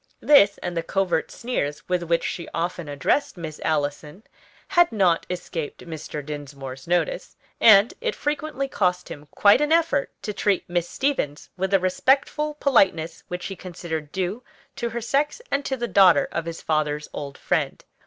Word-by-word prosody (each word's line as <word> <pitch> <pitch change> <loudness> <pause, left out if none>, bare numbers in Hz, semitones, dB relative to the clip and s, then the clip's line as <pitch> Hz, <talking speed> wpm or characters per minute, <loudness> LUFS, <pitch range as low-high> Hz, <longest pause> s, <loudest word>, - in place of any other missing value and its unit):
This, 205 -9 +6
and 175 - -3
the 165 - 0
covert 175 -1 0
sneers 150 - -3
with 180 -1 0
which 170 0 0
she 170 - -4
often 170 -2 -3
addressed 145 - 0
Miss 160 -3 -7
Allison 150 +4 -2 0.5
had 345 -5 +4
not 185 -6 +2
escaped 170 -4 -5
Mr. 155 -3 -6
Dinsmore's 140 -3 -7
notice, 175 - -1 0.2
and 215 0 +7
it 475 -2 -1
frequently 295 -2 -2
cost 180 -7 0
him 145 0 -9
quite 205 +6 +6
an 295 +1 +1
effort 325 -4 +2
to 210 - -3
treat 200 -2 0
Miss 175 -1 -1
Stevens 265 - -2
with 190 +1 -1
the 195 0 +4
respectful 270 - +1
politeness 190 - +2
which 180 0 -5
he 195 - -5
considered 170 -4 -6
due 190 +6 -2 0.3
to 235 - -2
her 235 +1 -4
sex 280 - 0
and 280 - +1
to 265 - -2
the 240 -1 -2
daughter 185 -6 +5
of 165 - -3
his 165 -1 -6
father's 150 -1 -1
old 140 -1 -6
friend. - - -1
180 Hz, 165 wpm, -24 LUFS, 160-240 Hz, 0.5 s, and